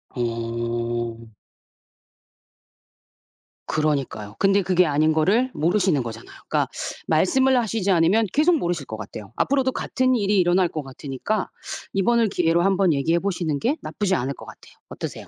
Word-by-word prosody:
어. 115 -1 -3 2.4
그러니까요. 140 -9 -2
근데 195 0 +4
그게 180 -1 +3
아닌 155 +1 +2
거를 215 +11 +2
모르시는 175 -2 +1
거잖아요. 115 0 -9
그러니까 - - +1 0.4
말씀을 260 +11 +3
하시지 220 -3 -1
않으면 185 +6 +3
계속 320 +3 +4
모르실 170 - -2
것 110 - -7
같아요. 105 -1 -9
앞으로도 265 -1 +1
같은 255 0 0
일이 205 -2 +2
일어날 180 0 +3
것 155 -3 -5
같으니까 135 +9 -4 0.4
이번을 225 +3 +2
기회로 170 -1 +2
한번 190 -3 +3
얘기해 165 +5 +1
보시는 170 -7 -2
게 285 +7 0
나쁘지 195 -3 -1
않을 135 0 -2
것 - - -12
같아요. - - -14 0.2
어떠세요? - - -7
175 Hz, 345 characters per minute, -23 LUFS, 135-205 Hz, 2.4 s, 근데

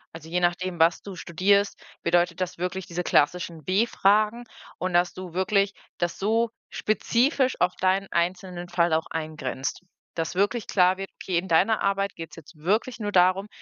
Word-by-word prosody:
Also, 160 0 -10
je 180 +1 0
nachdem, 175 0 0
was 165 +1 +4
du 195 -2 -8
studierst, 200 +5 +1 0.2
bedeutet 175 +1 +2
das 180 -2 -3
wirklich 180 +1 -3
diese 175 +1 -4
klassischen 165 0 +1
W-Fragen 215 +2 +2 0.3
und 185 -1 -3
dass 175 0 +3
du 185 -2 -8
wirklich 195 +2 +1 0.2
das 175 -1 -2
so 225 +3 +1 0.2
spezifisch 255 +5 +1
auf 180 0 +2
deinen 190 +1 +1
einzelnen 180 0 -2
Fall 170 -1 +2
auch 160 0 +1
eingrenzt. 155 -5 -4 0.3
Dass 165 +1 -3
wirklich 205 +4 0
klar 185 -1 +3
wird, 195 0 -6
okay, 175 -3 0
in 190 - -6
deiner 190 +6 +3
Arbeit 195 0 0
geht 165 -1 -7
es - - -9
jetzt 165 +1 -14
wirklich 215 +9 0
nur 205 -2 -3
darum, 185 +2 +3
185 Hz, 170 wpm, -25 LUFS, 170-200 Hz, 0.3 s, was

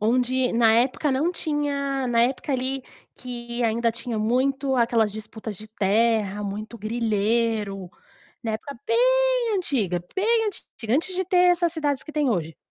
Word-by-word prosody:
Onde 250 +3 +1
na 230 -1 +5
época 255 +5 +2
não 305 +7 +1
tinha 280 -5 -2
na 235 -1 +3
época 265 +4 0
ali 265 +1 -1 0.3
que 240 -1 -5
ainda 230 0 +1
tinha 235 -1 -4
muito 265 +5 +1
aquelas 230 -4 +2
disputas 220 0 -7
de 215 +3 -11
terra, 210 0 +1
muito 210 +3 -5
grileiro, 215 -3 -1 0.5
na 225 - -2
época 250 +6 -6
bem - - +3
antiga, 225 - 0
bem 445 +3 +2
antiga, 240 - -4
antes 350 +5 0
de 375 +1 -1
ter 370 +1 0 0.2
essas 345 -2 0
cidades 290 -5 -1
que - - -9
tem 300 -2 +1
hoje. 165 -6 -2
240 Hz, 150 wpm, -24 LUFS, 220-290 Hz, 0.5 s, na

